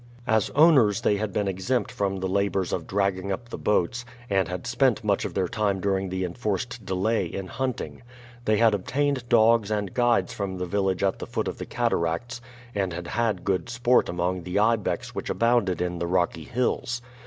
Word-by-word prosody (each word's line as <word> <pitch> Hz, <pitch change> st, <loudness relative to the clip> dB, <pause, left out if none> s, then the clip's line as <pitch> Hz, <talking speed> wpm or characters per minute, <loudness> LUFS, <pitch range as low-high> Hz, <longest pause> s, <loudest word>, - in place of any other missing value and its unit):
As 110 Hz, -2 st, +2 dB
owners 140 Hz, -10 st, +5 dB
they 105 Hz, -, +2 dB
had 105 Hz, 0 st, -2 dB
been 100 Hz, +1 st, -1 dB
exempt 95 Hz, +5 st, -1 dB
from 100 Hz, -1 st, -1 dB
the 95 Hz, -, 0 dB
labors 100 Hz, -1 st, 0 dB
of 85 Hz, -, -3 dB
dragging 100 Hz, -1 st, 0 dB
up 120 Hz, +4 st, -4 dB
the -, -, -5 dB
boats, 105 Hz, +4 st, +1 dB, 0.3 s
and 95 Hz, -3 st, +2 dB
had 90 Hz, +6 st, -5 dB
spent 125 Hz, -3 st, +2 dB
much 100 Hz, -2 st, +1 dB
of -, -, -5 dB
their 95 Hz, -2 st, +1 dB
time 100 Hz, 0 st, 0 dB
during 95 Hz, 0 st, 0 dB
the 95 Hz, 0 st, -2 dB
enforced 105 Hz, +4 st, -3 dB
delay 95 Hz, +1 st, 0 dB
in 95 Hz, +3 st, -5 dB
hunting. 130 Hz, +7 st, -4 dB, 0.4 s
They 110 Hz, -1 st, +3 dB
had 115 Hz, -1 st, +5 dB
obtained 130 Hz, +5 st, -1 dB
dogs 115 Hz, -2 st, +4 dB
and 105 Hz, -3 st, -2 dB
guides 120 Hz, -7 st, +2 dB
from 95 Hz, -2 st, -4 dB
the 90 Hz, -, -2 dB
village 95 Hz, 0 st, 0 dB
at 95 Hz, -1 st, +1 dB
the -, -, -6 dB
foot -, -, -2 dB
of -, -, -5 dB
the -, -, -5 dB
cataracts 120 Hz, +9 st, -1 dB, 0.3 s
and 95 Hz, -3 st, -1 dB
had 85 Hz, 0 st, -6 dB
had 110 Hz, -5 st, 0 dB
good 95 Hz, +1 st, -1 dB
sport 120 Hz, +1 st, +2 dB
among 90 Hz, +1 st, -1 dB
the 90 Hz, +2 st, -3 dB
ibex 110 Hz, 0 st, +1 dB
which -, -, -5 dB
abounded 115 Hz, -7 st, +2 dB
in 90 Hz, -1 st, -2 dB
the 85 Hz, -, -2 dB
rocky 85 Hz, -3 st, 0 dB
hills. 120 Hz, -1 st, -1 dB
100 Hz, 195 wpm, -26 LUFS, 95-115 Hz, 0.4 s, owners